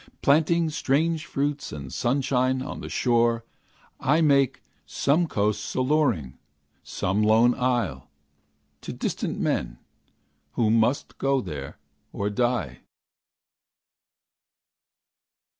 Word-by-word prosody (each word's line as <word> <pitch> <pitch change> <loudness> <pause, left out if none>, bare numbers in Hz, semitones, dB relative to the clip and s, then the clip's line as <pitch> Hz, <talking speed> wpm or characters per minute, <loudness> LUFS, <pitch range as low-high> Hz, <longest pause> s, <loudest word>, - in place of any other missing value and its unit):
Planting 160 +3 +3
strange 155 +3 0
fruits 145 +1 -2
and 70 -4 -8
sunshine 130 0 0
on 140 - -6
the - - -7
shore, 115 -1 +1 0.5
I 150 +4 +2
make 140 -5 +2 0.2
some 160 +5 +1
coast 105 -4 -1
alluring, 130 - 0 0.4
some 95 +3 -2
lone 110 +3 +4
isle, 120 - -1 0.7
To - - -6
distant - - -3
men, - - -1 0.8
who 110 -2 +1
must 115 +4 +1
go 135 0 +2
there, 75 - -7 0.3
or 100 +1 -2
die. 105 - -1
125 Hz, 95 wpm, -25 LUFS, 105-140 Hz, 0.8 s, lone